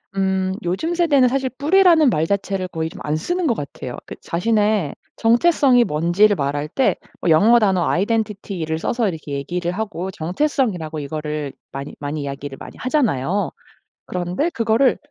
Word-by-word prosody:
음. 190 -1 0
요즘 190 - -1
세대는 290 -7 +4
사실 265 +1 0
뿌리라는 325 -1 +5
말 160 -6 +1
자체를 195 -2 -1
거의 160 -1 -3
좀 195 - -12
안 150 +1 -1
쓰는 350 - -2
것 235 - +3
같아요. 135 -3 -6
그 - - -8
자신의 205 -2 +1 0.2
정체성이 245 +1 +4
뭔지를 175 +6 +3
말할 145 +1 -1
때 265 - +2 0.3
어 175 - +3
영어 220 +10 +6
단어 190 -5 +2
아이덴티티를 195 -5 -1
써서 230 +4 0
이렇게 155 -4 -6
얘기를 175 +5 -2
하고 195 -3 -4
정체성이라고 180 - -1
이거를 150 -1 -4 0.2
많이 140 +1 -6
많이 145 +1 -4
이야기를 140 0 -6
많이 - - -10
하잖아요. 205 - 0 0.5
그런데 180 - -1
그거를 230 +1 +2
190 Hz, 355 characters per minute, -21 LUFS, 155-240 Hz, 0.5 s, 영어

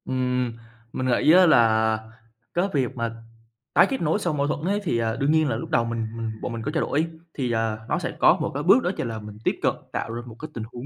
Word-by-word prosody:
Ừm, 125 -2 -1 0.4
mình 130 - -2
nghĩ 130 +5 +4
á 185 +2 +7
là 110 -6 +4 0.5
cái 175 +3 +1
việc 130 -5 0
mà 115 -1 -3 0.6
tái - - +6
kết 270 - -2
nối 165 +5 +1
sau 175 -6 -1
mâu 140 -1 0
thuẫn 150 - -1
ấy 200 +2 +1
thì, 155 -10 0
à, 115 -1 0
đương 140 +3 +1
nhiên 155 -2 +3
là - - 0
lúc 165 - -5
đầu 120 -8 +2
mình 115 -1 -2
mình 115 -1 -3
bọn 120 - -4
mình 115 - -4
có 145 - -3
trao 160 - 0
đổi 155 +3 0 0.3
thì, 125 -4 -2
ờ, 115 -1 -1
nó - - +1
sẽ - - -3
có - - +6
một - - -1
cái 145 +2 -3
bước 200 - +5
đó 180 - +1
chính - - -2
là 110 -1 -4
mình 105 -1 -10
tiếp - - +1
cận - - +2 0.2
tạo 115 - -3
ra 120 - -4
một 115 -3 -10
cái 155 - -7
tình 115 - -5
huống 120 +1 -7
125 Hz, 270 wpm, -24 LUFS, 115-155 Hz, 0.6 s, á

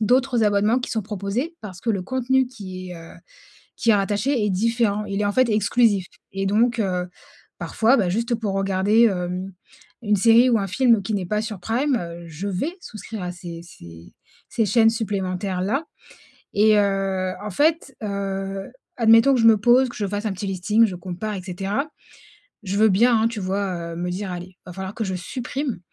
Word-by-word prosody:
d'autres 245 +1 +2
abonnements 210 +3 +3
qui - - -5
sont 220 - -1
proposés, 210 - -3
parce 190 -3 -9
que 235 - -1
le 195 -4 -1
contenu 260 +4 +1
qui 185 -6 -8
est 175 - -7
heu 165 0 -12 0.6
qui 230 - +2
est - - +6
rattaché 210 +5 0
est 210 - +1
différent, 210 +1 +1
il 200 0 -3
est 210 - +1
en 205 - 0
fait 255 +2 +3
exclusif. 210 -1 +2 0.3
Et 195 0 -2
donc, 235 +4 +2
heu, 180 -3 -1 0.5
parfois, 230 +4 +2
bah, 195 -5 +1
juste 230 +5 0
pour 215 -3 -3
regarder, 195 +3 +3
hem, 180 -1 -2 0.5
une 210 -2 +2
série 230 +5 +5
ou 230 - +3
un 200 - -2
film 230 +1 +3
qui 215 +3 -3
n'est 195 -3 -1
pas 210 +3 0
sur 220 -3 -5
prime, 250 +8 0
heu, 170 -4 -6
je 165 +4 -6
vais 280 - -3
souscrire 215 -1 -8
à 180 0 -4
ces 170 -2 -9
ces 85 - -14 0.4
ces 225 - +1
chaînes 225 +2 +4
supplémentaires 190 -4 -2
là. 270 - -1 0.7
Et 210 +1 +5
heu, 195 -2 0
en 210 - -4
fait, 290 - +1
heu, 195 -1 -4 0.3
admettons 230 +3 +6
que 250 - +2
je 225 - +4
me 225 -1 +7
pose 245 +5 +4
que 235 - -10
je 205 - -2
fasse 205 +2 -4
un 210 - -1
petit 195 +2 -5
listing 210 +5 +3
je 190 - -5
compare 185 +4 -5
et 185 - -6
cetera, 195 +9 -3 0.8
je 195 0 -2
veux 220 +1 +5
bien, 230 +5 +4
hein, 220 - +3
tu 230 -2 -5
vois, 185 -3 -2
heu, - - -7
me 175 +1 -3
dire: 190 +1 -4
«Allez, 180 +1 -7
va 180 - -9
falloir 190 +2 -6
que 225 - -2
je 190 - -3
supprime.» 250 - -4
205 Hz, 200 wpm, -23 LUFS, 185-230 Hz, 0.8 s, me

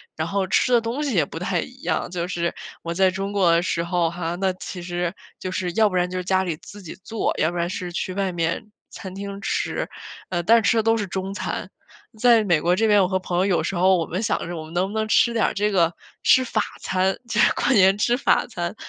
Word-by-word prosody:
然 160 +1 -2
后 195 +2 0
吃 190 +7 +2
的 240 - +6
东 230 +6 -3
西 275 -7 -1
也 160 -5 +3
不 165 - -8
太 180 0 -1
一 255 +9 -8
样。 - - -1
就 175 -1 -3
是 170 -1 -2 0.3
我 170 - -3
在 190 +2 +4
中 195 +2 -4
国 190 -4 +3
的 170 +1 +3
时 170 -2 -1
候 170 0 +1
哈， 170 0 -3
那 190 +1 0
其 180 0 -8
实 175 0 -2 0.3
就 185 - -4
是 185 -1 -2
要 220 -1 +4
不 185 - -5
然 180 0 +2
就 - - -5
是 - - -4
家 190 +1 +1
里 175 -4 -2
自 205 +5 -13
己 165 - -8
做， 225 -1 -1
要 155 - +3
不 175 - -5
然 170 0 0
是 180 0 -5
去 185 +2 -3
外 195 -1 -1
面 170 +4 -2 0.2
餐 190 -1 -8
厅 200 0 -6
吃， - - -2 0.4
呃， 175 -2 -1
但 230 +5 +5
吃 225 +2 +2
的 220 - +3
都 225 +1 +3
是 210 -3 -2
中 190 +2 -4
餐。 205 - -4 0.5
在 235 -1 +5
美 175 -6 +2
国 175 +2 +2
这 220 +3 +2
边， 205 -1 +5
我 185 - +3
和 190 0 0
朋 180 -1 -3
友 185 - +3
有 180 -5 +1
时 170 - -2
候 185 +2 +4
我 165 - -1
们 180 +6 -3
想 220 - -1
着 175 - -5
我 160 - -5
们 160 - -12
能 180 +2 +1
不 220 - -4
能 220 0 0
吃 235 +2 +4
点 230 - +2
儿 - - 0
这 210 +1 0
个， 170 -3 +3 0.3
吃 260 - +5
法 230 -3 0 0.2
餐， 190 +1 0
就 235 -3 -1
是 - - +5
过 245 - 0
年 195 -3 +5
吃 240 +4 +2
法 275 - +2
餐。 175 -4 -4
185 Hz, 285 characters per minute, -23 LUFS, 175-210 Hz, 0.5 s, 的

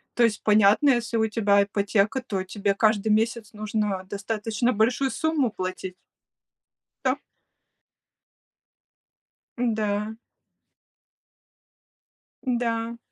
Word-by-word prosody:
То 240 - +3
есть 215 -3 +1
понятно, 215 +5 +5
если 235 -2 0
у 220 - +2
тебя 200 -2 +3
ипотека, 205 +4 0
то 195 -5 -3
тебе 200 +1 -1
каждый 215 0 +2
месяц 225 0 0
нужно 210 -3 -2
достаточно 215 +3 -1
большую 250 +5 +1
сумму 315 -6 0
платить. 185 -1 -5 1.1
Да. - - +1 2.4
Да. 215 -2 -1 2.3
Да. 235 -1 -1
215 Hz, 85 wpm, -25 LUFS, 205-235 Hz, 2.4 s, понятно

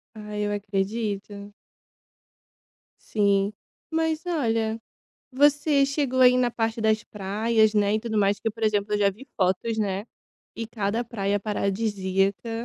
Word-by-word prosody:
Ai 210 -1 -5
eu 205 - -1
acredito. 205 0 -3 1.5
Sim, 200 -1 +1 0.4
mas, 320 0 0
olha, 225 -9 0 0.5
você 290 +1 +4
chegou 275 -2 0
a 255 - +9
ir 250 - +3
na 245 -1 +2
parte 225 -1 -2
das 220 -1 +2
praias, 215 +2 +1
né, 205 0 +3
e 215 - +1
tudo 220 -1 -3
mais 200 0 +2
que, 225 - -1
por 225 +1 -12
exemplo, 210 -1 +1
eu - - +1
já 200 -1 +3
vi 230 +8 -13
fotos, 190 +4 0
né, 200 0 -1 0.5
e 230 - -5
cada 220 +1 -2
praia 205 -4 -1
paradisíaca. 200 0 -1
215 Hz, 140 wpm, -25 LUFS, 200-235 Hz, 1.5 s, a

